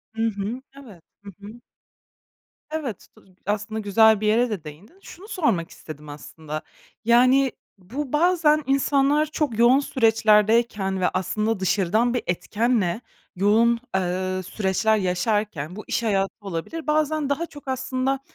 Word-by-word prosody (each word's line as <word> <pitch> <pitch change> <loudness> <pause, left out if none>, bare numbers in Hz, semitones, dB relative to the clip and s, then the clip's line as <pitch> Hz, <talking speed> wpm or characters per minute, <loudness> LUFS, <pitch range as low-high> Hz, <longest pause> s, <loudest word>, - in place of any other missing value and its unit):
Hı 225 - -3
hı. 220 +4 -4 0.2
Evet. 195 -10 -15 0.2
Hı 200 - -9
hı. 210 +4 -11 1.1
Evet, 285 - -5
tu - - -21 0.2
aslında 210 +2 -2
güzel 215 +1 +4
bir 215 - 0
yere 235 +3 +3
de 200 -7 -4
değindin. 170 - -13
Şunu 380 +4 -12
sormak 230 - 0
istedim 150 -1 -11
aslında. 155 +1 -7 0.4
Yani, 255 +3 +4 0.3
bu 245 +10 -6
bazen 310 -2 +3
insanlar 275 +2 +2
çok 295 -6 -2
yoğun 245 +4 +6
süreçlerdeyken 220 -5 +2
ve 180 - +3
aslında 215 +3 -1
dışarıdan 205 +5 +1
bir 245 - -1
etkenle 210 +2 0 0.3
yoğun, 225 +5 +3 0.2
eee, 185 0 -1
süreçler 210 +3 0
yaşarken, 185 -3 -1
bu 215 - -8
iş - - -1
hayatı 195 -3 0
olabilir, 200 - -6
bazen 305 -1 +1
daha 285 +4 -1
çok 290 -4 -14
aslında 260 +1 -1
220 Hz, 135 wpm, -23 LUFS, 190-265 Hz, 1.1 s, yoğun